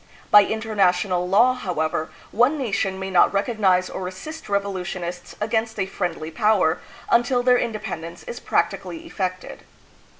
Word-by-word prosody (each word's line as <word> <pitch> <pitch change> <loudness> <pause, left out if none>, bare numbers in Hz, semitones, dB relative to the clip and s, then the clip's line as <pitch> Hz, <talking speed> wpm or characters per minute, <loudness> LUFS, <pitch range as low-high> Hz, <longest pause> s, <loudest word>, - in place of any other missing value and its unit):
By 205 -1 +8
international 195 -4 +1
law, 235 +7 +5
however, 160 -8 -2 0.2
one 250 +7 +3
nation 200 -7 -1
may 190 0 -5
not 180 - +5
recognize 195 -3 +2
or 185 - -5
assist 250 +13 -8
revolu 200 -2 -1
tionists 180 -1 -6
against 220 0 -1
a 195 - +1
friendly 175 -4 -4
power 195 -3 +2 0.3
until 245 +1 +3
their 250 0 +5
independence 200 -7 -5
is 485 -1 -7
practically 330 0 -1
effected. 185 - -4
200 Hz, 135 wpm, -23 LUFS, 180-225 Hz, 0.3 s, By